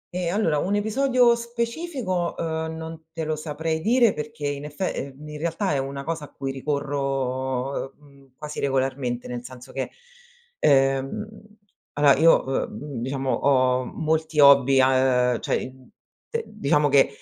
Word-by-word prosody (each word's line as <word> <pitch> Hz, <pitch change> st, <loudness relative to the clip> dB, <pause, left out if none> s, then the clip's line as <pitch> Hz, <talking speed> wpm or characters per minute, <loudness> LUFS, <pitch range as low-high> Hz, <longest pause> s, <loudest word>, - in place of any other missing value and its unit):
Ehm, 175 Hz, -2 st, -1 dB
allora, 160 Hz, -9 st, +2 dB
un 195 Hz, +6 st, 0 dB
episodio 240 Hz, +3 st, +3 dB
specifico, 235 Hz, -, -3 dB
uhm, 160 Hz, -1 st, -3 dB
non 160 Hz, 0 st, -8 dB
te 160 Hz, 0 st, -4 dB
lo 155 Hz, 0 st, -1 dB
saprei 160 Hz, +1 st, -3 dB
dire 235 Hz, 0 st, +4 dB
perché 150 Hz, 0 st, -6 dB
in 145 Hz, 0 st, -4 dB
effe 150 Hz, +6 st, -3 dB
ehm, 140 Hz, +2 st, -7 dB
in 150 Hz, 0 st, -7 dB
realtà, 170 Hz, +1 st, -1 dB
è 140 Hz, -, +1 dB
una 140 Hz, +1 st, -4 dB
cosa 160 Hz, -1 st, -4 dB
a -, -, -18 dB
cui 135 Hz, -1 st, -4 dB
ricorro, 135 Hz, -1 st, -2 dB
uhm, 140 Hz, -2 st, -21 dB
quasi 150 Hz, 0 st, -6 dB
regolarmente, 130 Hz, -2 st, -1 dB
nel 120 Hz, -1 st, -5 dB
senso 125 Hz, +1 st, -11 dB
che, 135 Hz, -, -3 dB, 0.7 s
ehm, 135 Hz, +7 st, +2 dB, 0.7 s
allora 145 Hz, -1 st, +5 dB
io, 165 Hz, 0 st, +5 dB
uhm, 135 Hz, -1 st, -3 dB
diciamo 135 Hz, +1 st, -2 dB
ho 130 Hz, -2 st, +2 dB
molti 160 Hz, 0 st, -1 dB
hobby 140 Hz, -2 st, +7 dB
a 130 Hz, -2 st, +3 dB
cioè, 130 Hz, -, -2 dB
uhm, 130 Hz, -1 st, -19 dB, 0.6 s
diciamo 150 Hz, -7 st, +1 dB
che 135 Hz, 0 st, +5 dB
145 Hz, 145 wpm, -24 LUFS, 135-165 Hz, 0.7 s, hobby